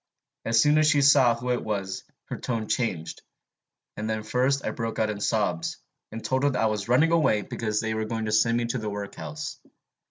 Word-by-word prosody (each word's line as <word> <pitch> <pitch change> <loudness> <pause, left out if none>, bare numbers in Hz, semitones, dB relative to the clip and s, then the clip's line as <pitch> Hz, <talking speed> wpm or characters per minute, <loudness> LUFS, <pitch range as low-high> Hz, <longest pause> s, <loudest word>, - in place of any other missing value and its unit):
As 115 0 +3
soon 150 +5 +5
as 155 - +4
she 145 - +4
saw 135 -4 +6
who 125 +2 -3
it 125 - -1
was, 100 -3 -3 0.3
her - - -4
tone 115 -3 -3
changed; 95 -11 -2 0.7
and 110 +1 -4
then 110 -1 -2
first 130 +5 +1
I - - -1
broke 115 -1 -4
out 110 -1 +1
in 100 -1 -6
sobs, 90 -7 0 0.3
and 115 +1 -7
told 130 0 +1
her 140 -3 +2
I 115 - +2
was 110 0 -1
running 150 +7 +4
away 135 -11 +3
because 110 -4 -2
they 110 -1 -2
were 110 0 -2
going 110 0 -3
to 110 - -2
send 115 +2 +3
me 120 - 0
to 120 +2 -2
the 110 -1 -3
workhouse. 105 +9 -6
115 Hz, 215 wpm, -26 LUFS, 110-130 Hz, 0.7 s, saw